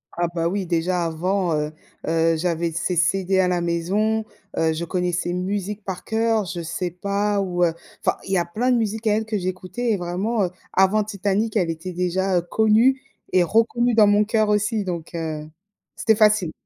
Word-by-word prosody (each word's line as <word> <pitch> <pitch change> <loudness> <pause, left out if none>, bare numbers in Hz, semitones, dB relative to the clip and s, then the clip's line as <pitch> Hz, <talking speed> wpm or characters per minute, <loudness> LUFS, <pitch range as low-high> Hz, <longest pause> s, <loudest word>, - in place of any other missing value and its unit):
Ah 175 0 0
bah, 170 0 -1
oui, 190 0 -2
déjà 175 +1 0
avant, 175 +2 0
heu 150 0 -1 0.4
heu, 165 0 +2
j'avais 170 0 -1
ses 170 +2 -2
CD 190 +2 +2
à 185 - +4
la 175 -1 0
maison, 200 +6 0 0.3
heu, 160 0 +2
je 160 +2 -3
connais 180 +1 -1
ses 175 0 -2
musiques 200 +3 -3
par 190 -2 -5
cœur, 225 -1 +1
je 175 -1 -5
sais 170 +2 -3
pas 200 +2 -1
où, 180 -2 0
heu 165 - 0 0.3
enfin - - +2
il 195 - -5
y 190 - +4
a 175 - +1
plein 230 +9 0
de 245 - +4
musiques 220 0 -2
à 210 - +4
elle 220 +1 -1
que 215 -1 -2
j'écoutais 185 +6 -3
et - - 0
vraiment, 190 +5 -1
heu, 180 - -1 0.2
avant 190 +3 +4
Titanic 205 +2 -1
elle 175 -4 +1
était 165 +3 -6
déjà, 180 +1 0
heu, - - +2
connue 220 +7 +3 0.3
et 185 - +4
reconnue 230 +5 +2
dans 215 -2 +7
mon 205 +1 +4
cœur 215 0 +1
aussi 210 +1 +1
donc, 170 -3 -5
heu, 155 -2 -4 0.5
c'était 220 - +2
facile. 210 -5 +3
185 Hz, 200 wpm, -22 LUFS, 170-210 Hz, 0.5 s, dans